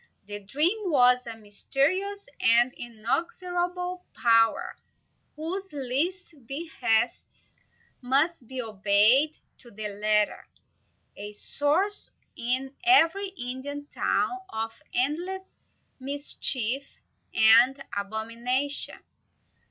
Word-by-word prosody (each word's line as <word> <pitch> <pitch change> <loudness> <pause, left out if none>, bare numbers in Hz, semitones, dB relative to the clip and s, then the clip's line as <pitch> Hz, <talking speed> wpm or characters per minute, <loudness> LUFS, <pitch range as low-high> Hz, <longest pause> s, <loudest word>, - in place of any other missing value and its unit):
The 205 0 -6
dream 345 - 0
was 250 -4 +4
a 225 -1 -7
mysterious 300 - -1
and 240 +2 +4
inexorable 355 - -3
power, 230 -1 +2 0.6
whose 370 +6 -5
least 300 +7 -2
behests 270 -6 -2 0.4
must 270 +2 0
be 260 +1 -7
obeyed 220 +6 +3 0.2
to 240 - -14
the 215 -1 -6
letter, 210 +1 0 0.7
a 205 +1 -8
source, 305 - +1 0.3
in 260 +3 -2
every 370 +2 +4
Indian 285 -3 -6
town, 375 - 0
of 225 -3 -5
endless 350 +9 -2 0.4
mischief 270 -2 +2 0.3
and 240 +5 +5
abomination. 230 +7 0
265 Hz, 85 wpm, -26 LUFS, 230-340 Hz, 0.7 s, and